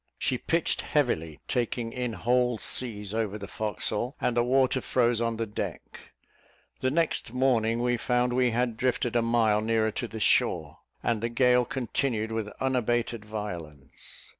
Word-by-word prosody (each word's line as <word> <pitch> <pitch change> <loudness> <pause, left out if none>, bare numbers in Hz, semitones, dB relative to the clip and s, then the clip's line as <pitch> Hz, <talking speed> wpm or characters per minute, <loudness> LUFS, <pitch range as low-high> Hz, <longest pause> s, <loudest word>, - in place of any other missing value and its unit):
She 125 - -1
pitched 165 0 0
heavily, 80 - 0
taking 120 -1 -1
in 125 -2 -2
whole 125 +3 +1
seas 105 -3 -1
over 110 -2 -1
the 100 -1 -7
forecastle, 110 +3 -2
and 120 - 0
the 120 - +4
water 130 +1 +2
froze 120 -2 +2
on 115 -1 0
the 115 - -1
deck. 105 - -7 0.7
The 130 - +1
next 155 -5 0
morning 120 -3 +2
we 120 0 +2
found 125 +1 +1
we 125 0 +3
had 120 -1 0
drifted 125 -1 0
a 120 - +4
mile 115 -2 +3
nearer 110 0 +1
to 120 - -3
the 110 - -7
shore, - - +1 0.2
and 115 -3 0
the 115 - -1
gale 125 +1 +4
continued 120 -3 -1
with 110 -2 -2
unabated 120 -3 0
violence. 90 -10 -6
120 Hz, 160 wpm, -28 LUFS, 110-125 Hz, 0.7 s, the